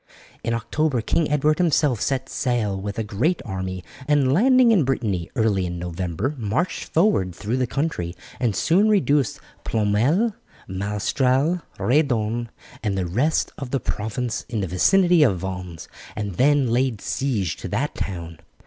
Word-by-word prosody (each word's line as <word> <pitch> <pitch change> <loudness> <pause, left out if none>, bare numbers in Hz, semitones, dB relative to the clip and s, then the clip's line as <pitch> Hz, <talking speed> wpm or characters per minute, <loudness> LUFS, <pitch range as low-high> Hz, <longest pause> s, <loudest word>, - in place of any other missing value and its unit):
In 115 - 0
October 130 +3 0
King 155 +7 0
Edward 150 +1 +2
himself 150 - +2
set 135 -1 -1
sail 120 -6 -1
with 100 +1 -5
a 115 - 0
great 120 - 0
army, 95 -3 -4 0.2
and 140 -3 +3
landing 250 - +5
in 195 -8 +4
Brittany 105 -9 -1
early 105 -6 +1
in 90 0 -5
November 90 - -3
marched 115 - -1
forward 155 - +1
through 110 +7 -2
the 130 -1 0
country 115 - -2 0.2
and 115 -6 0
soon 195 +6 +3
reduced 150 - +2 0.2
Ploermel, 120 - +1 0.3
Malestrail, 125 - 0 0.2
Redon, 120 -4 +1 0.3
and 100 -3 -1
the 95 - 0
rest 125 - 0
of 135 -3 -5
the 135 - 0
province 110 +2 -3
in 115 -3 -2
the 95 - -2
vicinity 175 - +4
of 115 -11 +4
Vannes, 90 -2 -6 0.3
and 105 -2 -3
then 140 -2 +3
laid 125 -2 +1
siege 110 - -1
to - - -6
that - - -1
town. 85 -4 -5
120 Hz, 150 wpm, -23 LUFS, 100-145 Hz, 0.3 s, landing